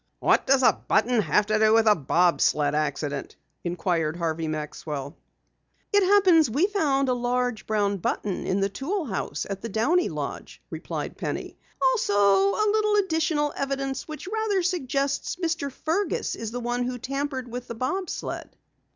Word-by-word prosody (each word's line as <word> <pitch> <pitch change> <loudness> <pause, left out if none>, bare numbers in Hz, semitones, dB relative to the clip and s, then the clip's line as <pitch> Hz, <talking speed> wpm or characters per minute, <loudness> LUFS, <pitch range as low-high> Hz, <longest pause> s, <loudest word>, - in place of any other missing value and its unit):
"What - - +2
does 270 0 +4
a - - +6
button 225 +1 +3
have 210 0 +2
to 215 0 +1
do 220 0 +5
with 225 0 +5
the 215 - +7
bob 175 +1 +2
sled 145 -1 +2
accident?" 145 -1 -2 0.3
inquired 170 -2 -1
Harvey 165 -1 -2
Maxwell. 150 -2 -5 0.8
"It 405 - +5
happens 370 -5 +5
that 225 - -7
we 320 +6 +4
found 295 -10 +1
a 255 - +2
large 245 -2 -1
brown 205 -2 +1
button 190 +1 -2
in 195 +1 0
the 195 - +2
tool 320 - -3
house 185 - -3
at 195 -1 -5
the 230 - -5
Downey 280 - +2
lodge," - - -6
replied - - -5
Penny. - - -4 0.4
"Also 420 - 0
a 200 - +4
little 425 0 +2
additional 320 -6 +1
evidence 275 -1 -3
which 310 +3 -8
rather 420 -2 0
suggests 280 -6 -1
Mr. 325 -5 -2
Fergus 330 +9 -1
is 225 - -5
the 245 +2 -4
one 240 +1 -2
who 250 0 -3
tampered 275 0 -3
with 245 +1 -6
the 235 - -6
bob 335 - -2
sled." - - -6
245 Hz, 170 wpm, -25 LUFS, 195-320 Hz, 0.8 s, the